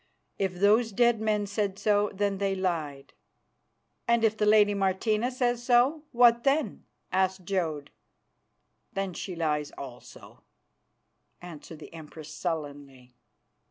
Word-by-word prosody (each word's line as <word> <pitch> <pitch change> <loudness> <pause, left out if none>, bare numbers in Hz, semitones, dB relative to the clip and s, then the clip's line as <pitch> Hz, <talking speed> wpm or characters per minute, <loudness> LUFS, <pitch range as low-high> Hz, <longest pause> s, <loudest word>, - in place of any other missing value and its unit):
If 190 -2 -1
those 215 +5 +3
dead 235 +1 +2
men 210 -1 0
said 200 -1 -2
so, 205 0 +2
then 200 -1 -1
they 195 -1 0
lied." 160 -7 -3 0.9
"And 235 -1 +3
if 220 -1 +3
the 210 -1 0
lady 210 -1 +5
Martina 205 +4 0
says 245 -2 -1
so, 250 +5 +3
what 235 -1 +5
then?" 285 +3 0 0.3
asked 190 0 0
Jodd. 160 -7 -2 1.0
"Then 195 -2 -3
she 180 +1 -6
lies 150 -3 -1
also," 130 -3 -11 1.0
answered 165 -2 -10
the 155 - -13
Empress 155 -1 -10
sullenly. 145 -6 -6
195 Hz, 125 wpm, -28 LUFS, 160-220 Hz, 1.0 s, lady